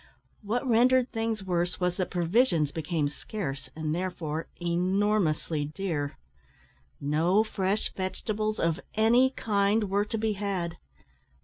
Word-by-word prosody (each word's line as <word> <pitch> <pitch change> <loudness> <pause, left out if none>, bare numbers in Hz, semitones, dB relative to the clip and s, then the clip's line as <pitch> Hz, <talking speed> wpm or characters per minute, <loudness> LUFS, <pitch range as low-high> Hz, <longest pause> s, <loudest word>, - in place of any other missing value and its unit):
What 235 +5 -1
rendered 250 +2 +4
things 225 -2 -2
worse 175 -2 -1
was 180 -1 0
that 185 - -1
provisions 175 - +2
became 155 -1 -1
scarce, 145 -3 -5
and, 155 -1 -2
therefore, 165 -3 -3
enormously 175 -3 +1
dear. 150 -3 -3 0.8
No 165 +8 +3
fresh 200 -1 -1
vegetables 215 +3 -2
of 165 +1 +1 0.2
any 235 +4 +5
kind 205 -3 +1
were 200 +1 +2
to 225 - -3
be 220 0 0
had. 190 -4 -2
190 Hz, 120 wpm, -28 LUFS, 165-215 Hz, 0.8 s, any